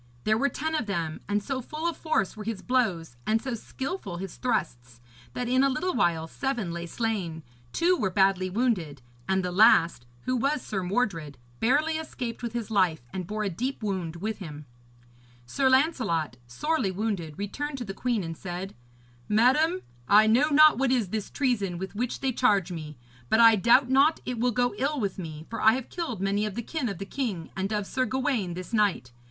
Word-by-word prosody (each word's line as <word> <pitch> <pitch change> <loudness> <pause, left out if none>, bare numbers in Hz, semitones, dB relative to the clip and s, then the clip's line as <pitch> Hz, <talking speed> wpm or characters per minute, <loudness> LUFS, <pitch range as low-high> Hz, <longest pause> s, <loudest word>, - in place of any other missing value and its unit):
There 215 - +3
were 275 +6 +2
ten 315 +3 -3
of 300 -8 -1
them, 165 -5 -3
and 205 0 +1
so 270 +1 -3
full 310 +6 -4
of 340 - -1
force 310 - -1
were 215 - -7
his 210 -3 -4
blows 190 - 0
and 220 +1 +3
so 260 +1 -4
skilful 260 - -5
his 190 0 -6
thrusts, 125 - -2 0.3
that 245 - -3
in 255 +2 +3
a 275 - +4
little 355 +8 -1
while 165 -2 +1
seven 240 - -2
lay 170 0 -5
slain, 185 -7 -3 0.3
two 355 +2 +3
were 215 - 0
badly 190 -1 +2
wounded, 180 - -1 0.3
and 190 -1 +1
the 180 - -2
last, 170 - +5
who 255 - -1
was 275 +3 0
Sir 195 -3 -3
Mordred, 180 - -1 0.2
barely 305 +7 +2
escaped 250 -7 -5
with 235 -2 -4
his 235 -2 -4
life, 185 - +2
and 185 -2 -4
bore 215 +2 -2
a 205 - 0
deep 250 +7 -3
wound 185 -5 -2
with 210 +5 -4
him. 150 -5 -8 0.8
Sir 265 - +1
Lancelot, 250 - +1
sorely 255 - -1
wounded, 185 -6 -3
returned 275 +9 -4
to 245 - -5
the 195 - -5
queen, 235 -1 -1
and 165 -1 -5
said: 180 +3 -6 0.6
'Madam, 300 - +3 0.3
I 210 +1 +7
know 245 +8 +4
not 305 -1 +6
what 270 -1 +2
is 235 -7 +1
this 215 +1 -3
treason 210 -10 0
with 190 +2 -6
which 240 +4 -3
they 265 -1 +1
charge 205 -7 +2
me; 155 -3 -7 0.3
but 220 - +3
I 230 -1 +8
doubt 235 +6 +5
not 275 +5 +4
it 250 -2 -3
will 250 +2 +2
go 245 +1 +1
ill 285 +2 0
with 200 -4 -2
me, 155 -3 -7
for 230 - -5
I 220 - +6
have 255 0 -4
killed 320 - -4
many 200 +1 +1
of 205 - -6
the 235 - -3
kin 285 -1 -2
of 195 - -5
the 195 - -5
king 200 - -4
and 195 +2 -2
of 210 -2 -1
Sir 255 +5 -1
Gawaine 250 -9 -1
this 185 +5 -8
night. 205 - +1
215 Hz, 205 wpm, -27 LUFS, 185-255 Hz, 0.8 s, I